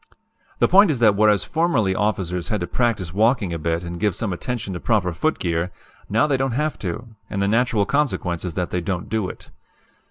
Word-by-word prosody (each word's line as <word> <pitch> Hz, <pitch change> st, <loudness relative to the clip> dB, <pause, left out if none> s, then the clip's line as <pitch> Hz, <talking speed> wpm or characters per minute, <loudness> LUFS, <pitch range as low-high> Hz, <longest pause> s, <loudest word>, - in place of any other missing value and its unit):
"The -, -, +3 dB
point 200 Hz, +1 st, +6 dB
is 150 Hz, -, +1 dB
that 110 Hz, -4 st, +4 dB
whereas 105 Hz, -1 st, +4 dB
formerly 155 Hz, -, +1 dB
officers 95 Hz, -4 st, -1 dB
had 105 Hz, -4 st, -1 dB
to -, -, 0 dB
practice 95 Hz, -3 st, -1 dB
walking 105 Hz, -3 st, +2 dB
a 85 Hz, -, -3 dB
bit 85 Hz, +2 st, -1 dB
and 85 Hz, 0 st, -6 dB
give 105 Hz, -2 st, +1 dB
some 105 Hz, -5 st, -2 dB
attention 110 Hz, +1 st, -4 dB
to 90 Hz, -, -4 dB
proper 95 Hz, -6 st, +1 dB
footgear, 85 Hz, -, -1 dB, 0.4 s
now 115 Hz, +7 st, +3 dB
they 145 Hz, -3 st, +1 dB
don't 135 Hz, -2 st, -1 dB
have 150 Hz, +4 st, -1 dB
to, 95 Hz, +5 st, -5 dB, 0.2 s
and 100 Hz, -, -3 dB
the 100 Hz, -, +1 dB
natural 115 Hz, -1 st, +2 dB
consequence 110 Hz, -, 0 dB
is 90 Hz, -4 st, -4 dB
that 90 Hz, -1 st, -2 dB
they 90 Hz, -, -1 dB
don't 90 Hz, +1 st, -3 dB
do 110 Hz, -4 st, -1 dB
it. -, -, -11 dB
105 Hz, 210 wpm, -22 LUFS, 90-120 Hz, 0.4 s, point